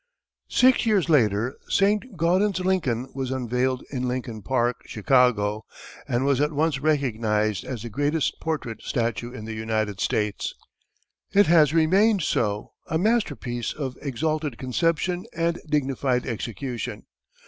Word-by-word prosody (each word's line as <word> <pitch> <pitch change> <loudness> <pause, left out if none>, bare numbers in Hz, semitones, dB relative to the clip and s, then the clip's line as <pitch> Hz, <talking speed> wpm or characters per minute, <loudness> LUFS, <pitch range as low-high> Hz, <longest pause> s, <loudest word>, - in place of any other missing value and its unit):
Six 255 -2 +4
years 200 -6 +2
later 115 -4 +2
Saint 205 +2 +1
Gaudens's 185 +3 +2
"Lincoln" 135 -10 0
was 130 -1 -3
unveiled 130 0 -1
in 125 -2 -2
Lincoln 125 -3 -4
Park, 120 +2 0
Chicago, 110 -3 +2 0.4
and 120 +3 0
was 140 -1 +2
at 150 +1 +2
once 150 -1 0
recognized 110 -8 0
as 120 -4 -6
the 120 - -5
greatest 145 +6 0
portrait 135 -9 -3
statue 120 -1 -2
in 120 -4 -8
the 110 - -5
United 110 -2 -2
States. 105 -1 -1 0.8
It 205 +1 +6
has 155 -4 +5
remained 185 +5 +3
so 105 -7 -1 0.2
a 160 - 0
masterpiece 155 - 0
of 135 -4 -4
exalted 150 0 -2
conception 165 +7 0
and 170 0 0
dignified 135 -3 0
execution. 120 +1 -5
130 Hz, 130 wpm, -25 LUFS, 115-160 Hz, 0.8 s, It